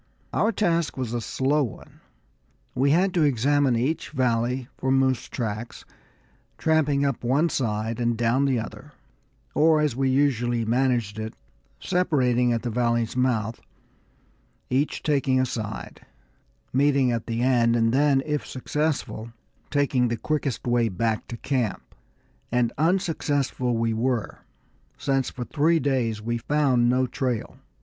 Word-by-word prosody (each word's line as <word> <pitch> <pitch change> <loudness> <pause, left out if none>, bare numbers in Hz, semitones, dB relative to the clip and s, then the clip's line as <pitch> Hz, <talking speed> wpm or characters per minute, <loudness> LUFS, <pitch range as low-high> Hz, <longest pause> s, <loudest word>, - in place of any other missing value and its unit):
Our 220 - +2
task 170 -9 0
was 125 -3 -3
a 120 - -1
slow 135 +6 0
one; 120 - -8 0.7
we 135 +2 +2
had 180 +5 +3
to 175 - +2
examine 140 -1 +2
each 135 +7 -1
valley 125 -2 0
for 130 - -1
moose 130 -1 +1
tracks, 115 0 -5 0.7
tramping 150 -3 +2
up 135 -4 -2
one 140 +8 +2
side 110 -3 -2
and 120 -1 0
down 120 +4 +2
the 135 -3 +1
other, 115 - -7 0.6
or 155 +1 +4
as 150 -5 +1
we 135 0 +1
usually 120 -4 +1
managed 120 -3 0
it, 110 0 -5 0.4
separating 130 -9 +1
at 115 -1 -1
the 120 - -2
valley's 120 0 0
mouth, 120 -4 0 1.1
each 135 +4 0
taking 140 -3 +2
a 130 - +3
side, 110 -4 -6 0.7
meeting 135 -1 +3
at 115 -2 -3
the 115 0 -1
end 120 -2 +3
and 115 0 +2
then, 140 0 +3
if 150 -1 -1
unsuccessful, 135 -4 -3 0.4
taking 140 -4 +2
the 115 0 -2
quickest 145 0 -2
way 120 -2 +2
back 110 +3 -1
to 120 - -6
camp. 125 -5 -2 0.6
And 120 -1 +1
unsuccessful 145 -7 0
we 115 0 0
were, 120 0 -1 0.6
since 135 -2 0
for 125 - -6
three 165 +4 +2
days 120 -6 -1
we 120 +1 -2
found 130 -3 +2
no 130 +1 +2
trail. 125 -2 -3
130 Hz, 140 wpm, -25 LUFS, 115-145 Hz, 1.1 s, or